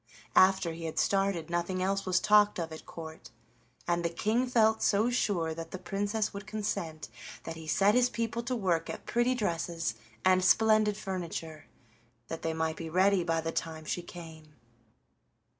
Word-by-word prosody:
After 190 Hz, -2 st, +5 dB
he 165 Hz, 0 st, -7 dB
had 160 Hz, -, -5 dB
started 195 Hz, -5 st, +1 dB
nothing 180 Hz, +2 st, -1 dB
else 195 Hz, +1 st, -1 dB
was 185 Hz, 0 st, +3 dB
talked 210 Hz, 0 st, +4 dB
of 165 Hz, -2 st, -3 dB
at 160 Hz, -, -10 dB
Court, 160 Hz, -1 st, -9 dB, 0.6 s
and 175 Hz, 0 st, +1 dB
the 170 Hz, -, +1 dB
King 220 Hz, +9 st, 0 dB
felt 220 Hz, -3 st, +3 dB
so 215 Hz, +4 st, +2 dB
sure 175 Hz, -9 st, 0 dB
that 165 Hz, 0 st, -7 dB
the 185 Hz, -, -6 dB
Princess 205 Hz, +4 st, -2 dB
would 200 Hz, +1 st, -8 dB
consent 200 Hz, -7 st, -3 dB, 0.4 s
that 165 Hz, -, -6 dB
he 160 Hz, -1 st, -10 dB
set 195 Hz, +6 st, +3 dB
his 250 Hz, 0 st, +4 dB
people 230 Hz, -1 st, -2 dB
to 245 Hz, +2 st, -2 dB
work 180 Hz, -7 st, 0 dB
at -, -, -6 dB
pretty 240 Hz, +2 st, +1 dB
dresses 170 Hz, -, -2 dB, 0.3 s
and 185 Hz, 0 st, +4 dB
splendid 215 Hz, +1 st, +4 dB
furniture, 170 Hz, -5 st, -5 dB, 0.6 s
that 165 Hz, -, -5 dB
they 165 Hz, -, -1 dB
might 160 Hz, 0 st, -1 dB
be 165 Hz, -, -6 dB
ready 190 Hz, +2 st, +3 dB
by 165 Hz, -1 st, 0 dB
the 165 Hz, 0 st, -3 dB
time 160 Hz, -1 st, -4 dB
she 175 Hz, -, -2 dB
came. 160 Hz, -3 st, -11 dB
185 Hz, 175 wpm, -30 LUFS, 165-210 Hz, 0.6 s, After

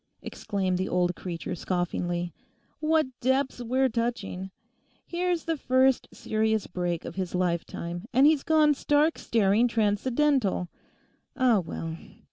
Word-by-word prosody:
exclaimed 190 Hz, -3 st, -2 dB
the 185 Hz, -, -1 dB
old 180 Hz, 0 st, +1 dB
creature 170 Hz, -3 st, -5 dB
scoffingly. 175 Hz, 0 st, -2 dB, 0.5 s
'What 315 Hz, 0 st, +2 dB
depths 260 Hz, 0 st, 0 dB
we're 260 Hz, +3 st, +2 dB
touching. 230 Hz, -6 st, -3 dB, 0.6 s
Here's 350 Hz, -1 st, -1 dB
the 325 Hz, -1 st, -1 dB
first 260 Hz, -1 st, +2 dB
serious 220 Hz, -1 st, 0 dB
break 175 Hz, -2 st, -3 dB
of -, -, -6 dB
his 185 Hz, -2 st, -3 dB
lifetime, 175 Hz, 0 st, -2 dB
and 260 Hz, +3 st, +5 dB
he's 305 Hz, -2 st, +5 dB
gone 310 Hz, -1 st, +4 dB
stark 295 Hz, +3 st, +2 dB
staring 220 Hz, +1 st, +3 dB
transcendental. 230 Hz, -, +1 dB, 0.7 s
Ah 250 Hz, -6 st, +4 dB
well. 165 Hz, -1 st, -5 dB
220 Hz, 120 wpm, -27 LUFS, 180-265 Hz, 0.7 s, and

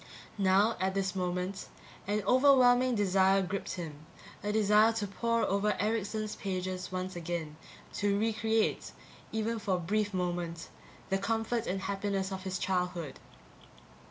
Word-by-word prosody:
Now, 195 Hz, +4 st, +3 dB
at 190 Hz, +1 st, 0 dB
this 195 Hz, -1 st, -1 dB
moment, 180 Hz, +1 st, -2 dB, 0.4 s
an 205 Hz, 0 st, 0 dB
overwhelming 255 Hz, 0 st, +5 dB
desire 195 Hz, -1 st, +3 dB
gripped 190 Hz, +2 st, -3 dB
him, 155 Hz, -4 st, -7 dB, 0.4 s
a 205 Hz, -, -1 dB
desire 215 Hz, +1 st, +4 dB
to 220 Hz, -2 st, -2 dB
pour 230 Hz, +4 st, 0 dB
over 200 Hz, +2 st, +1 dB
Erickson's 215 Hz, 0 st, -1 dB
pages 185 Hz, -1 st, -4 dB
once 185 Hz, 0 st, -4 dB
again, 170 Hz, -3 st, -4 dB, 0.4 s
to 200 Hz, -1 st, +2 dB
re 225 Hz, +2 st, +1 dB
create, 220 Hz, 0 st, 0 dB, 0.4 s
even 220 Hz, +1 st, -1 dB
for 195 Hz, -3 st, 0 dB
a -, -, -2 dB
brief 205 Hz, +4 st, 0 dB
moment, 175 Hz, -2 st, -3 dB, 0.4 s
the 195 Hz, -, +2 dB
comfort 225 Hz, +3 st, -1 dB
and 190 Hz, +1 st, -2 dB
happiness 195 Hz, 0 st, -2 dB
of 190 Hz, 0 st, -4 dB
his 185 Hz, 0 st, -2 dB
childhood. 180 Hz, -4 st, -2 dB
195 Hz, 140 wpm, -31 LUFS, 185-215 Hz, 0.4 s, overwhelming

